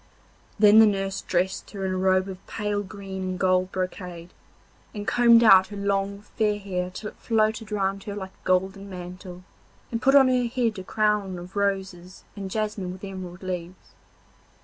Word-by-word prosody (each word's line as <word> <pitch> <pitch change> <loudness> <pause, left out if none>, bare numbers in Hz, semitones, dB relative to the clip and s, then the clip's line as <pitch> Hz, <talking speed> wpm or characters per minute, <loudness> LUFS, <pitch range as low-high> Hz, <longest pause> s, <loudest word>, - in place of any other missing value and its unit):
Then 210 0 +7
the 220 - +8
nurse 195 -1 -1
dressed 185 +1 -1
her 195 -2 -5
in 190 - -1
a 185 - -1
robe 185 0 +2
of 190 -1 -8
pale 210 -1 -2
green 195 -1 -7
and 185 0 -3
gold 185 0 +2
brocade, 180 -2 -5 0.6
and 205 0 -5
combed 235 -1 +6
out 190 -4 +7
her 205 - -8
long 200 0 -1 0.2
fair 210 -1 +2
hair 180 -3 -3
till 210 +3 -7
it - - -27
floated 220 -1 0
round 195 -1 -1
her 205 - -5
like 190 -2 -6
a - - -32
golden 190 +2 0
mantle, 180 0 -9 0.5
and 230 0 -2
put 270 +1 +4
on 270 -2 +8
her 250 -1 +2
head 235 -4 -1
a - - -6
crown 210 -2 0
of 175 +3 -10
roses 190 -3 -2
and 195 -2 -6
jasmine 210 -3 -3
with 185 +2 -11
emerald 185 -2 -7
leaves. 180 -1 -6
195 Hz, 180 wpm, -25 LUFS, 185-210 Hz, 0.6 s, the